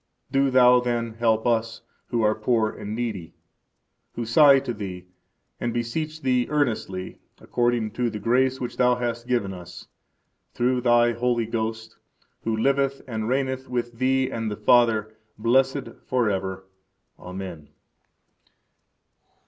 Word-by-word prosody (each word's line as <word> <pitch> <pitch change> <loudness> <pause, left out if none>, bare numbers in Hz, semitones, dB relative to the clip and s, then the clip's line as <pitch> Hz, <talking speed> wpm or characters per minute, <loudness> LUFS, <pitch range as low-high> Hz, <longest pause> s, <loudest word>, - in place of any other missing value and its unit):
Do 135 0 +3
Thou, 125 -1 +6
then, 120 -2 -2
help 110 -1 +2
us, 115 -1 0 0.2
who 120 -2 0
are 105 0 +4
poor 110 0 +1
and 105 +1 -6
needy, 110 -8 -4 0.8
who 120 - -4
sigh 140 +4 +6
to 125 -3 -4
Thee, 95 -4 -7 0.5
and 120 -1 -2
beseech 155 +7 -3
Thee 125 -2 +2
earnestly, 115 -10 -2 0.2
according 120 -3 0
to 120 +1 -1
the 110 - -5
grace 130 +5 +1
which 125 - -5
Thou 125 -1 +4
hast 120 -1 -3
given 120 -6 0
us, 90 -2 -11 0.7
through 125 +1 +1
Thy 120 -1 +4
Holy 120 0 0
Ghost, 110 0 -4 0.5
who 110 -1 -1
liveth 135 +3 +1
and 110 -2 -3
reigneth 130 0 -1
with 120 -2 -3
Thee 130 0 +1
and 115 -1 -3
the 105 - -5
Father, 110 -1 +3 0.2
blessed 130 +4 +1 0.2
forever. 95 -6 -1 0.5
Amen. 90 -4 -8
120 Hz, 130 wpm, -24 LUFS, 110-125 Hz, 0.8 s, Thou